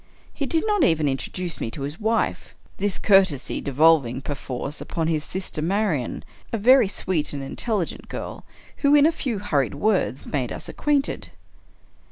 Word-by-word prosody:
He 280 - -3
did 325 - 0
not 415 -5 +2
even 160 - +3
introduce 170 +6 -3
me - - -2
to 135 +4 -6
his 145 +4 -5
wife; 225 +1 -1
— - - -31
this 200 -1 0
courtesy 190 -9 +3
devolving, 140 -3 +3
perforce, 140 0 -5
upon 165 -2 -2
his 155 -2 0
sister 185 -4 -3
Marian 180 - -1 0.2
— - - -29
a 230 - 0
very 250 +2 +6
sweet 185 -6 -1
and 140 -1 -4
intelligent 195 - -2
girl, - - -6 0.3
who, 285 0 +4
in 290 0 +6
a 320 - +5
few 260 -9 -3
hurried 145 - 0
words, 185 -5 0
made 130 -5 -2
us - - -6
acquainted. 290 -2 -1
175 Hz, 170 wpm, -24 LUFS, 145-220 Hz, 0.3 s, very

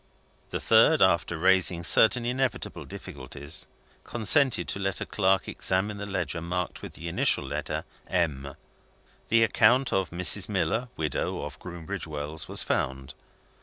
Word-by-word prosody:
The - - -3
third, 115 +8 +5
after 85 -2 +3
raising 90 0 +3
certain 115 +8 +5
inevitable 130 +1 -2
difficulties, 70 +2 -8 0.4
consented 130 +3 +2
to - - -3
let 95 -2 -1
a - - -3
clerk 95 -2 +1
examine 100 +3 -1
the 100 0 -6
ledger 90 -3 -2
marked 90 +1 -3
with - - -8
the 85 - -8
initial 85 - +1
letter - - -4 0.2
"M." 70 -6 -1 0.7
The 115 +1 +5
account 120 +4 +3
of 95 -2 +1
Mrs. 85 -1 +1
Miller, 120 +2 0
widow, 75 -1 -2
of - - -8
Groombridge 85 -3 -6
Wells, 75 +1 -5
was - - +1
found. 65 0 -2
95 Hz, 140 wpm, -27 LUFS, 80-110 Hz, 0.7 s, third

